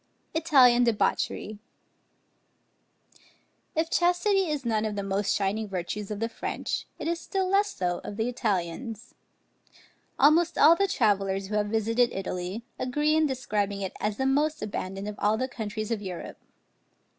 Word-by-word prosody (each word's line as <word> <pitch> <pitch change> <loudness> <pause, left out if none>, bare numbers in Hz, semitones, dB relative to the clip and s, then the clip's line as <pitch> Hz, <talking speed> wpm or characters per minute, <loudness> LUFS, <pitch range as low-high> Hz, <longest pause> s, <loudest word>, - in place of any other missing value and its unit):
ITALIAN 265 -7 +5
DEBAUCHERY. 215 -2 0 2.2
If 320 +1 0
chastity 360 +2 +2
is 295 -4 -2
none 220 -2 +1
of 215 -1 -2
the 200 - -2
most 195 0 0
shining 205 +2 -1
virtues 195 +2 -4
of 210 -1 -4
the 225 - 0
French, 230 - -4
it - - -5
is 340 0 -1
still 380 +1 -2
less 400 +2 +2
so 175 -1 -1
of 205 - -7
the 225 +1 0
Italians. 220 0 -3 1.0
Almost 330 +4 +4
all 330 - +7
the 395 +2 +2
travellers 195 - +1
who 210 - -2
have 210 0 +1
visited 225 +3 +2
Italy, 185 +3 -4 0.2
agree 295 +4 +1
in 315 -1 +3
describing 205 -7 -2
it 190 - -3
as 210 0 -1
the 265 - 0
most 295 +3 +1
abandoned 195 -1 -4
of 210 - -6
all 210 +1 +2
the 255 - -1
countries 220 -3 -5
of 220 -3 -1
Europe. 185 -4 -7
220 Hz, 155 wpm, -27 LUFS, 205-295 Hz, 2.2 s, all